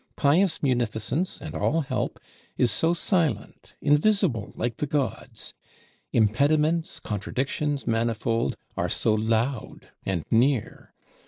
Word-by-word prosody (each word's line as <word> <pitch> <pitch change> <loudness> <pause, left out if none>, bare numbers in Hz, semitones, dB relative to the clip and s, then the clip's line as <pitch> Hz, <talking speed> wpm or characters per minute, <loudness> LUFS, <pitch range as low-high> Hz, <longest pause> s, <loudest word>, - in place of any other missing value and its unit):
Pious 160 +5 +2
munificence, 125 - 0
and 155 - -6
all 165 +2 +1
help, 135 -3 -3 0.4
is 120 - +3
so 165 - +2
silent, 165 - -1
invisible 145 - +2
like 120 -2 -2
the 150 - -2
gods; 140 -2 -3 0.6
impediments, 150 +9 +2
contradictions 135 +7 -2
manifold, 115 0 0 0.2
are - - -1
so 110 - +2
loud 110 +3 -1
and 90 -5 -2
near! 120 +1 +1
130 Hz, 105 wpm, -26 LUFS, 115-150 Hz, 0.6 s, is